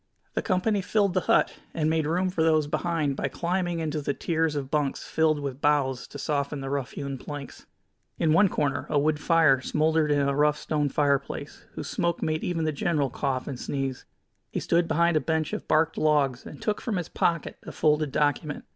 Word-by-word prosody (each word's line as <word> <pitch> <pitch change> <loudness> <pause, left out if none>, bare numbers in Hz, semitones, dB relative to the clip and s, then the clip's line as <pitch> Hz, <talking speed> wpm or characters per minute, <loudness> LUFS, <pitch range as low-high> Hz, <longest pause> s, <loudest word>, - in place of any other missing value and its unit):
The - - 0
company 200 +1 +1
filled 200 0 +1
the 185 - +3
hut, - - +3 0.2
and 155 -2 +1
made 160 -1 +1
room 180 +3 +1
for 170 - -1
those 155 -2 +3
behind 155 -2 -1
by - - -1
climbing 175 0 -1
into 155 -2 -2
the 140 0 -2
tiers 160 -2 0
of 135 -2 -4
bunks 145 -3 0
filled 155 -2 +2
with 140 -1 -5
boughs 140 -4 +1
to - - -9
soften 145 0 -2
the 135 0 -5
rough 140 -3 -2
hewn 140 -2 -5
planks. 145 0 -8 0.5
In 160 -2 +2
one 195 +4 +5
corner 145 -4 -1
a 150 - +1
wood 150 +1 +2
fire 155 -5 +4
smoldered 155 +2 +1
in 145 -1 +3
a 140 - +1
rough 150 +1 +3
stone 150 -1 -1
fireplace, 140 0 -1
whose - - -6
smoke 170 -1 -1
made 155 0 -1
even 165 -2 -1
the 155 - +1
general 145 -3 0
cough 130 0 -2
and 130 -3 -5
sneeze. 135 -2 -3 0.4
He - - -3
stood 170 0 +1
behind 170 0 +3
a - - +1
bench 160 -1 -1
of - - -4
barked 160 +1 +2
logs, 145 -5 +1
and 145 - -10
took 210 -1 -1
from 220 -5 -2
his 175 - -3
pocket 170 -3 -1
a - - -8
folded 150 -1 +1
document. 145 +1 0
150 Hz, 205 wpm, -26 LUFS, 140-165 Hz, 0.5 s, one